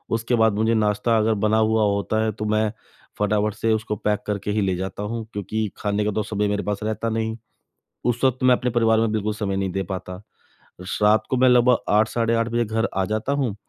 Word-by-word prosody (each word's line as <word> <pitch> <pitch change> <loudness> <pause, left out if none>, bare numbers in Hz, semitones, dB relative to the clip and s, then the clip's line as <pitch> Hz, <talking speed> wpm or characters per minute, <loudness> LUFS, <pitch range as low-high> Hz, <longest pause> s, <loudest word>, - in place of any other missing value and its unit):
उसके 115 +2 0
बाद 110 -2 +3
मुझे 110 +2 +1
नाश्ता 110 +1 +1
अगर 110 +1 +2
बना 110 +1 +3
हुआ 110 0 +2
होता 110 +2 0
है 110 - 0
तो 105 +1 -5
मैं 110 0 +1 0.5
फटा-फट 105 0 +1
से 115 +1 0
उसको 110 -1 -2
पैक 105 +1 -1
करके 105 0 -2
ही 105 0 0
ले 95 -2 0
जाता 95 +3 -5
हूँ, 115 +1 -4
क्योंकि 105 +2 -2
खाने 105 0 -1
का 105 - +1
तो 105 +1 -1
समय 105 0 -1
मेरे 105 0 -1
पास 105 -1 -2
रहता 110 +1 -2
नहीं। 110 0 -2 0.7
उस 120 +1 0
वक्त 130 0 +1
मैं 130 -1 +6
अपने 125 0 -1
परिवार 115 -1 +3
में 115 -1 +1
बिल्कुल 105 0 -1
समय 100 -2 -2
नहीं 95 -1 -1
दे 95 - -1
पाता। 90 0 -5 0.9
रात 105 +1 +4
को 130 - +1
मैं 130 0 +5
लगभग 125 0 +5
8 105 +1 +4
साढ़े 115 -1 0
8 115 0 +1
बजे 120 +1 0
घर 115 +2 0
आ 95 - +2
जाता 110 +6 -2
हूँ। 130 -8 -1
110 Hz, 230 wpm, -23 LUFS, 105-115 Hz, 0.9 s, मैं